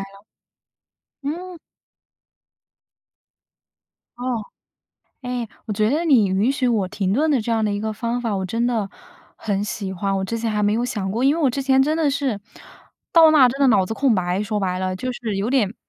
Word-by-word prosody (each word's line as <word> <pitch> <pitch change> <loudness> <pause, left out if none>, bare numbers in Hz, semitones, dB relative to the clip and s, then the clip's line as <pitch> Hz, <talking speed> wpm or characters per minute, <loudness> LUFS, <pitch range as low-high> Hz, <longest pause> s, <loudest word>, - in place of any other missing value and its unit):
了， 195 +1 -11 1.0
嗯。 350 +5 -5 2.6
哦。 245 -2 -2 0.8
哎， 250 -1 -3 0.2
我 215 - -3
觉 215 +1 +1
得 310 +5 0
你 260 -10 +4
允 195 +6 +1
许 270 -2 0
我 215 -6 +1
停 195 0 -1
顿 310 +7 +2
的 275 -5 +2
这 230 - -2
样 225 -1 +1
的 210 - 0
一 205 - -2
个 220 0 -2
方 235 +3 -3
法， 225 -4 -2
我 190 - -2
真 230 +5 -1
的， 225 -5 -1 0.5
很 200 -2 -2
喜 200 -2 -4
欢， 195 +1 -1
我 190 - -1
之 230 +4 -3
前 225 0 -2
还 210 -1 -1
没 205 - +2
有 230 +2 0
想 205 -6 -3
过。 225 +5 -2
因 280 +4 +3
为 335 - -2
我 270 - +4
之 275 - -3
前 265 0 +4
真 300 +3 +1
的 315 -3 +2
是， 270 -7 -2 0.7
到 325 -1 +7
那 305 -3 +5
儿 250 - +7
真 270 +3 -5
的 275 - +5
脑 205 -7 +4
子 220 - -5
空 260 0 +2
白， 185 +1 0
说 210 0 -2
白 185 -2 -1
了， 185 0 -2
就 255 +6 -3
是 225 -4 -4
有 200 +4 -1
点 230 -6 +1
225 Hz, 225 characters per minute, -21 LUFS, 200-265 Hz, 2.6 s, 到